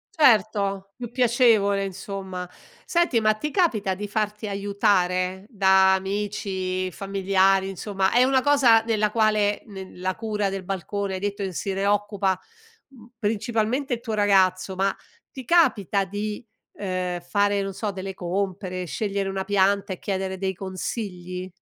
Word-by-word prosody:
Certo, 200 Hz, -, +3 dB
più 240 Hz, -2 st, -7 dB
piacevole 230 Hz, -5 st, +3 dB
insomma. 190 Hz, -1 st, -6 dB, 0.4 s
Senti, 340 Hz, -9 st, +2 dB
ma 215 Hz, -1 st, +3 dB
ti 300 Hz, +8 st, -4 dB
capita 225 Hz, -, +1 dB
di 205 Hz, +2 st, -5 dB
farti 210 Hz, +1 st, -2 dB
aiutare 195 Hz, -2 st, 0 dB
da 190 Hz, -3 st, +5 dB
amici, 190 Hz, -1 st, -2 dB
familiari, 195 Hz, 0 st, +2 dB
insomma 195 Hz, 0 st, -1 dB
è 245 Hz, -, +5 dB
una 260 Hz, 0 st, +3 dB
cosa 255 Hz, -6 st, +5 dB
nella 215 Hz, -2 st, +1 dB
quale 215 Hz, -2 st, +2 dB
nel 190 Hz, -3 st, -10 dB
la 185 Hz, +1 st, -1 dB
cura 210 Hz, -3 st, -1 dB
del 195 Hz, -1 st, -5 dB
balcone 195 Hz, +1 st, -3 dB
hai -, -, -4 dB
detto 200 Hz, +1 st, -3 dB
che 190 Hz, -, -3 dB
se 195 Hz, +3 st, -3 dB
ne 195 Hz, +1 st, -1 dB
occupa, 205 Hz, -2 st, +1 dB, 0.5 s
mhmm, 240 Hz, -5 st, -16 dB
principalmente 230 Hz, +4 st, -1 dB
il 235 Hz, -, -11 dB
tuo 225 Hz, -, -4 dB
ragazzo, 190 Hz, -2 st, +2 dB
ma 195 Hz, +1 st, +1 dB, 0.4 s
ti 260 Hz, -2 st, -9 dB
capita 225 Hz, -, +3 dB
di, 205 Hz, +3 st, -5 dB, 0.3 s
ehm, 185 Hz, -2 st, -3 dB
fare, 200 Hz, +2 st, +1 dB
non 195 Hz, 0 st, -4 dB
so, 210 Hz, +2 st, -3 dB
delle 190 Hz, 0 st, -6 dB
compere, 185 Hz, 0 st, -3 dB
scegliere 200 Hz, +2 st, -2 dB
una 195 Hz, 0 st, -2 dB
pianta 200 Hz, 0 st, +2 dB
e -, -, -8 dB
chiedere 190 Hz, -1 st, -3 dB
dei 190 Hz, 0 st, -2 dB
consigli? 185 Hz, -1 st, -5 dB
200 Hz, 145 wpm, -24 LUFS, 190-215 Hz, 0.5 s, da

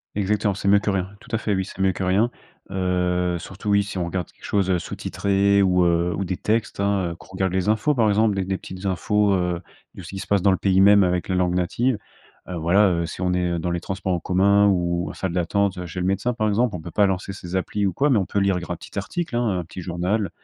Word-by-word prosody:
Exactement, 105 Hz, 0 st, +1 dB
c'est 100 Hz, -, -4 dB
mieux 100 Hz, +1 st, +6 dB
que 105 Hz, 0 st, 0 dB
rien, 95 Hz, -1 st, -1 dB
tout 110 Hz, -, -5 dB
à -, -, 0 dB
fait, 105 Hz, -3 st, -1 dB
oui, 95 Hz, 0 st, -1 dB
c'est 95 Hz, -, -12 dB
mieux 95 Hz, 0 st, +3 dB
que 95 Hz, -, -4 dB
rien, 100 Hz, +6 st, +2 dB, 0.4 s
heu, 90 Hz, -2 st, 0 dB
surtout 95 Hz, +4 st, -7 dB
oui, 100 Hz, 0 st, +5 dB
si 100 Hz, -1 st, -6 dB
on 90 Hz, -, -1 dB
regarde 90 Hz, 0 st, -4 dB
quelque -, -, -16 dB
chose, 100 Hz, -2 st, 0 dB
heu, 90 Hz, -, +3 dB
sous-titré 100 Hz, +3 st, +1 dB
ou, 90 Hz, -1 st, +3 dB
heu, 85 Hz, 0 st, +1 dB
ou 100 Hz, -, -2 dB
des 90 Hz, 0 st, -3 dB
textes, 110 Hz, -1 st, -1 dB
hein, 100 Hz, -3 st, +1 dB
heu, -, -, -11 dB
qu'on -, -, -17 dB
regarde 95 Hz, -1 st, -1 dB
les 95 Hz, +2 st, -1 dB
infos, 110 Hz, +7 st, +2 dB
par 115 Hz, -3 st, +3 dB
exemple, 105 Hz, 0 st, +2 dB
des 95 Hz, -1 st, -1 dB
des 95 Hz, 0 st, -2 dB
petites 95 Hz, +1 st, -9 dB
infos, 105 Hz, +2 st, +1 dB
heu, 90 Hz, -2 st, 0 dB, 0.4 s
de -, -, -9 dB
ce -, -, -10 dB
qui 95 Hz, -, -6 dB
se -, -, -7 dB
passe 100 Hz, -3 st, +2 dB
dans 100 Hz, -, +5 dB
le 95 Hz, -, +2 dB
pays 95 Hz, -1 st, +3 dB
même 100 Hz, 0 st, +7 dB
avec 90 Hz, 0 st, 0 dB
la 95 Hz, -, +1 dB
langue 90 Hz, -1 st, +1 dB
native, 110 Hz, +7 st, 0 dB, 0.5 s
heu, 90 Hz, -, -5 dB
voilà, 95 Hz, +5 st, +4 dB
heu, 85 Hz, -1 st, 0 dB
si 95 Hz, -, -7 dB
on 90 Hz, 0 st, +1 dB
est 90 Hz, -1 st, 0 dB
dans 85 Hz, +2 st, -2 dB
les 85 Hz, -, -1 dB
transports 95 Hz, 0 st, -3 dB
en 85 Hz, -, 0 dB
commun 100 Hz, +3 st, +3 dB
ou 85 Hz, -2 st, 0 dB
en -, -, -7 dB
salle 95 Hz, -3 st, -3 dB
d'attente, 90 Hz, +2 st, 0 dB
heu, 90 Hz, -, -5 dB
chez 85 Hz, +3 st, -6 dB
le 90 Hz, -, -1 dB
médecin, 100 Hz, +6 st, 0 dB
par 110 Hz, -2 st, 0 dB
exemple, 110 Hz, +1 st, +1 dB
on 90 Hz, -, -5 dB
peut 85 Hz, -, -8 dB
pas 100 Hz, +2 st, +3 dB
lancer 95 Hz, +1 st, -2 dB
ces 95 Hz, -1 st, -7 dB
applis 100 Hz, +2 st, 0 dB
ou 95 Hz, -, -2 dB
quoi, 145 Hz, +7 st, +2 dB
mais 115 Hz, -, +4 dB
on 95 Hz, -, -2 dB
peut -, -, -4 dB
lire 100 Hz, -2 st, +2 dB
gr 85 Hz, -, -9 dB
un 90 Hz, -, -2 dB
petit 100 Hz, -, -7 dB
article, 160 Hz, -, -4 dB
hein, 120 Hz, -, +1 dB
hein, 90 Hz, -2 st, 0 dB
un 85 Hz, -, -10 dB
petit 90 Hz, +2 st, -8 dB
journal, 90 Hz, +4 st, -1 dB
95 Hz, 280 wpm, -23 LUFS, 90-100 Hz, 0.5 s, même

